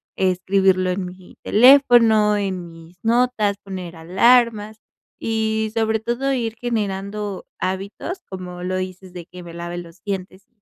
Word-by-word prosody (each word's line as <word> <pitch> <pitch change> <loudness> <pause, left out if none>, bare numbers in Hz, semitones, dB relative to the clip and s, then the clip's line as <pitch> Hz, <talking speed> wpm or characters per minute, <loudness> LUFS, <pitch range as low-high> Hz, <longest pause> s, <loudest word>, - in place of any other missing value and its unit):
escribirlo 185 0 +2
en 180 0 -2
mi 180 0 -12
teléfono, 230 -4 +6
en 185 -4 -3
mis 165 +2 -15
notas, 230 -3 +2
poner 185 -3 -7
alarmas, 215 +5 +2 0.4
y 220 -1 -1
sobre 220 -1 +1
todo 240 +5 -1
ir 230 -3 -2
generando 205 -3 -3
hábitos, 200 - -4
como 180 -1 -7
lo 185 +1 -2
dices 185 0 -6
de 175 -2 -9
que 180 -1 -11
me 170 - -10
lave 170 +1 -6
los 170 0 -10
dientes, 190 -1 -5
195 Hz, 135 wpm, -21 LUFS, 185-220 Hz, 0.4 s, teléfono